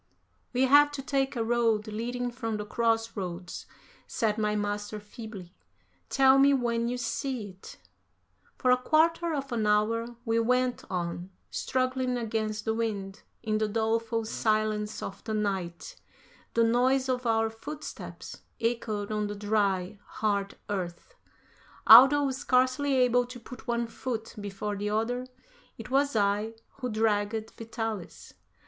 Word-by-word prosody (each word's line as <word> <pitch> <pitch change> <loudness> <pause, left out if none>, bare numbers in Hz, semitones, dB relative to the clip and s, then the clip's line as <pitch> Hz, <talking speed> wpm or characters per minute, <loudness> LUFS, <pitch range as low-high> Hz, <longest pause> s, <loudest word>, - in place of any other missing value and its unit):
"We 255 +1 +2
have 290 +2 +6
to 275 -2 -5
take 270 0 0
a 230 - 0
road 225 -2 +2
leading 240 +3 -3
from 225 -2 -3
the 210 - -5
cross 225 +1 0
roads," 180 -2 -6 0.4
said 220 -1 0
my 210 0 +1
master 205 0 -2
feebly; 205 -3 -10 0.6
"tell 270 0 +5
me 280 +1 +6
when 235 -2 0
you 245 +1 -2
see 245 -2 -3
it." 190 0 -13 0.8
For 255 - +2
a 250 - +6
quarter 330 +4 +3
of 275 -2 -4
an 225 -3 0
hour 230 +3 +1
we 225 0 +2
went 250 +2 +1
on, 175 0 -3 0.2
struggling 255 -1 -1
against 215 -2 -2
the 220 - +1
wind; 210 -3 -3 0.2
in 215 -1 0
the 215 - +1
doleful 225 +1 0
silence 215 -1 0
of 195 - -7
the 220 - -3
night 190 -5 -3 0.6
the 230 - +4
noise 255 +3 +3
of 255 -1 -1
our 225 0 +2
footsteps 295 +7 -8 0.2
echoed 225 -3 -1
on 210 -1 -1
the 205 - -5
dry, 205 -2 0
hard 200 -2 -1
earth. 185 - -4 0.7
Although 270 +4 +9
scarcely 260 +2 +2
able 245 -1 +3
to 245 0 -9
put 240 +1 -12
one 235 0 0
foot 230 -1 -5
before 205 +1 -4
the 205 +1 -2
other, 240 +4 -1 0.5
it 225 +2 -9
was 280 -1 +2
I 210 +2 +1 0.2
who 250 -2 -2
dragged 215 0 0
Vitalis. 225 -4 -6
225 Hz, 140 wpm, -28 LUFS, 210-250 Hz, 0.8 s, Although